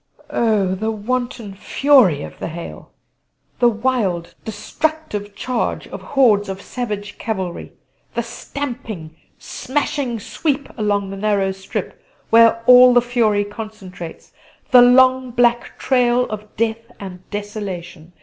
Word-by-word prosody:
Oh! 210 -5 +1
the 215 +4 -2
wanton 235 0 -3
fury 205 - +3
of - - -10
the - - -4
hail; 170 +1 -8 0.7
the 240 - +5
wild, 220 -7 -1
destructive 215 -1 -3
charge 250 +2 -2
of - - -8
hordes 220 -8 +3
of 190 0 -5
savage 210 -3 -5
cavalry; 190 -6 -4 0.4
the 235 - 0
stamping, 230 - -6 0.2
smashing 265 -3 -2
sweep 280 +6 -2
along 205 -3 -1
the 195 - -6
narrow 200 -1 +1
strip 190 0 -6 0.3
where 230 0 +6
all 250 0 +8
the 245 - +7
fury 225 -4 +1
concentrates; 205 -5 -9 0.4
the 250 -2 +9
long 255 +1 +5
black 240 0 +1
trail 250 -1 +2
of 215 0 -7
death 230 +1 -2
and 185 -2 -10
desolation! 195 -5 -6
220 Hz, 120 wpm, -20 LUFS, 200-245 Hz, 0.7 s, the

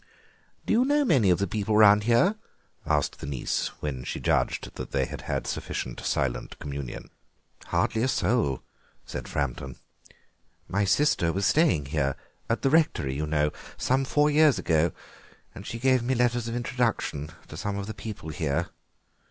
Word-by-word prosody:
"Do - - +1
you 235 +3 +4
know 290 +2 +2
many 130 - +4
of 90 - +4
the 100 - 0
people 105 +2 0
round 105 -1 +7
here?" 120 - +4 0.5
asked - - 0
the - - -6
niece, 70 -4 -1
when 65 -4 -3
she - - -4
judged - - 0
that - - -6
they - - 0
had - - -7
had - - -3
sufficient - - -4
silent 65 -2 -2
communion. 70 -3 -6 0.5
"Hardly 110 - 0
a 130 - +2
soul," 105 - +1 0.4
said - - -6
Framton. 65 -2 -3 0.9
"My 100 +2 +1
sister 100 - +2
was 100 +3 -1
staying 120 - +3
here, 70 -3 +1 0.3
at 115 - 0
the 135 - +3
rectory, 150 - +2
you 75 +3 -2
know, 75 -1 +1 0.3
some 130 +1 +1
four 145 +3 +2
years 150 -1 +5
ago, 80 0 +2 0.6
and - - -10
she 115 - -4
gave 130 +1 +3
me 130 +2 0
letters 120 -1 +1
of 115 - -3
introduction 120 - -1 0.2
to - - -8
some 105 -1 -3
of 100 - -3
the 110 - -5
people 105 -9 -7
here." 75 -3 -1
105 Hz, 170 wpm, -27 LUFS, 75-130 Hz, 0.9 s, round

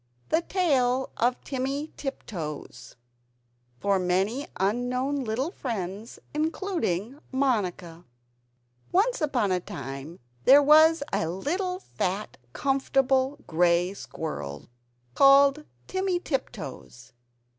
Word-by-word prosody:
THE 320 - +3
TALE 265 -9 +1
OF 245 +2 +1
TIMMY 275 +3 -3
TIPTOES 175 - -6 0.8
[For 200 +6 +2
Many 190 +9 0
Unknown 250 +7 0
Little 250 +8 -2
Friends, 210 - -5 0.2
Including 300 - -2
Monica] 195 -11 -1 0.9
Once 435 +6 +2
upon 255 -10 +1
a 180 - +2
time 140 +1 -7 0.3
there 285 +2 +8
was 315 +2 +6
a 160 - 0
little 360 - -2
fat 200 - -3
comfortable 270 - +1
grey 175 +2 +2
squirrel, 75 - -6 0.4
called 275 - +6 0.2
Timmy 375 -1 -1
Tiptoes. 185 - -6
255 Hz, 90 wpm, -27 LUFS, 185-290 Hz, 0.9 s, there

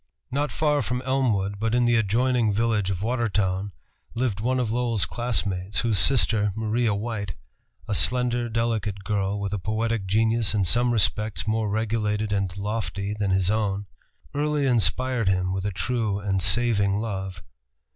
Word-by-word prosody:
Not 145 +3 -1
far 150 -2 +1
from 125 +1 -2
Elmwood, 110 -7 0
but 115 +2 0
in 120 0 +3
the 120 0 +3
adjoining 115 +2 +2
village 110 -3 +1
of 95 0 -2
Watertown, 105 -5 0 0.4
lived 115 -5 -1
one 125 +4 0
of 120 -3 -1
Lowell's 115 -6 0
classmates, 100 0 -1
whose 115 -5 +2
sister, 105 -2 +4
Maria 110 0 0
White, 100 -4 -4 0.5
a 110 - -1
slender, 120 +1 +1
delicate 110 -3 -1
girl, 100 0 -1
with 100 0 -3
a 105 - -1
poetic 110 +1 -1
genius 110 +1 +2
in 100 -2 +2
some 120 +6 +4
respects 110 -1 +1
more 110 0 0
regulated 105 -1 -1
and 100 -2 -2
lofty 100 -1 -3
than 105 -2 -2
his 95 0 +2
own, 100 -2 -1 0.5
early 150 0 0
inspired 125 -2 +1
him 90 -1 0
with 95 +1 -2
a - - -2
true 110 0 -1
and 100 -2 -1
saving 100 -2 +2
love. 95 -5 -4
110 Hz, 155 wpm, -25 LUFS, 100-120 Hz, 0.5 s, sister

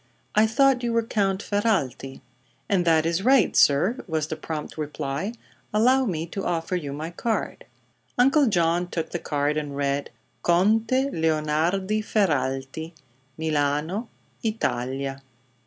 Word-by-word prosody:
"I 215 +1 +5
thought 265 +3 +3
you 235 -1 -1
were 230 0 +2
Count 200 -3 0
Ferralti." 165 - -1 0.5
"And 185 -3 +1
that 160 -1 +4
is 170 +2 0
right, 255 -2 +4
sir," 175 - +4
was 160 -3 -1
the - - -2
prompt 155 -1 -6
reply. 150 +5 -3 0.4
"Allow 255 +5 +4
me 165 -7 -2
to 190 +3 -5
offer 170 +1 -1
you 150 -6 -3
my 155 +4 -5
card." 225 +6 -3 0.5
Uncle 270 +3 +5
John 175 -3 +2
took 165 -2 -4
the 175 - -2
card 145 0 -1
and 145 -2 -4
read: 140 0 -1 0.3
"CONTE 200 - +3 0.2
LEONARDI 160 - 0
FERRALTI, 150 -6 -1 0.4
Milano, 155 - -1 0.3
Italia." 135 - -2
170 Hz, 130 wpm, -25 LUFS, 150-215 Hz, 0.5 s, I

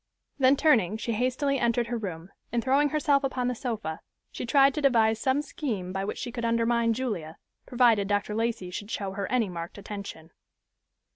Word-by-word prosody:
Then 265 +1 +5
turning, 220 - +3
she 235 - -3
hastily 255 +4 0
entered 235 0 +1
her 240 +1 -3
room, 180 -3 -6 0.2
and 235 -1 0
throwing 280 +3 +3
herself 285 -1 +2
upon 255 -2 -1
the - - -1
sofa, 220 -10 -4 0.3
she 245 - -6
tried 275 +2 +5
to 300 - -3
devise 225 -5 +3
some 270 +2 +1
scheme 215 - -4
by 195 0 -2
which - - -4
she 245 - -5
could 235 0 -5
undermine 230 0 +2
Julia, 205 -11 -4 0.3
provided 235 -5 +3
Dr. 205 +1 0
Lacey 225 -4 -2
should 205 +3 -6
show 200 -3 -3
her 195 0 -4
any 245 -4 +2
marked 170 0 -7
attention. 200 -5 -8
230 Hz, 185 wpm, -27 LUFS, 200-255 Hz, 0.3 s, Then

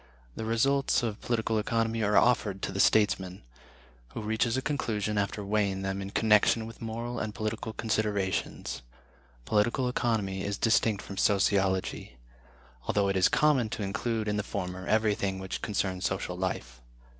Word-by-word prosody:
The 110 - -4
results 135 +4 +2
of 110 -3 -3
political 110 -2 0
economy 115 +1 0
are 105 0 +3
offered 105 -5 +2
to - - -1
the 95 - -4
statesman, 95 - +2 0.7
who 115 - -4
reaches 110 +3 0
a - - 0
conclusion 105 -8 -1
after 100 0 -2
weighing 100 -2 0
them 95 0 -2
in 95 - -5
connection 110 +1 +3
with 115 0 -11
moral 115 +2 -4
and 110 -1 -4
political 110 0 -3
considerations. 105 - -2 0.6
Political 120 +4 +1
Economy 105 -6 -1
is 100 0 -2
distinct 110 -2 +2
from 100 - -8
Sociology; 95 - +1 0.7
although 100 -1 +2
it 95 - 0
is 95 -1 +4
common 135 -7 +3
to 105 - -4
include 110 +2 -2
in 105 0 0
the - - +1
former 95 -2 -5
everything 105 -3 +1
which 95 0 -5
concerns 95 -3 -2
social 95 -1 -2
life. 60 -10 -4
105 Hz, 155 wpm, -29 LUFS, 95-115 Hz, 0.7 s, is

